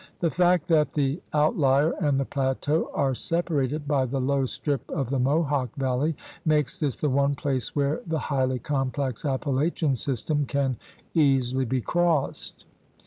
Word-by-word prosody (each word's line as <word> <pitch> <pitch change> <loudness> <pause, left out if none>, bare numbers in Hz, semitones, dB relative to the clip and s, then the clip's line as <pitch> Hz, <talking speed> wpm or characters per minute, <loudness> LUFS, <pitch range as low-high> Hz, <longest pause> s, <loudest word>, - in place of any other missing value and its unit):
The 165 -2 +1
fact 180 -1 +2
that 155 -2 +3
the 145 +2 0
out 150 +2 +2
lier 140 +3 +4
and 145 -4 +2
the 135 - 0
plateau 140 +3 0
are 135 -1 +1
separated 150 -1 -1
by 140 -3 +2
the 135 +2 -2
low 135 0 +1
strip 140 0 -3
of 135 -6 -2
the 135 - +1
Mohawk 140 -2 +1
Valley 135 +3 0 0.3
makes 150 -4 +1
this 145 -4 -1
the 150 - 0
one 140 +1 +2
place 130 -4 -2
where 145 +1 0
the 160 -1 0
highly 130 -3 0
complex 135 -2 -2
Appalachian 140 +2 0
system 140 +3 -1
can 135 -2 0 0.4
easily 135 -4 +2
be 130 +1 -1
crossed. 170 -1 -1
140 Hz, 155 wpm, -26 LUFS, 130-150 Hz, 0.4 s, lier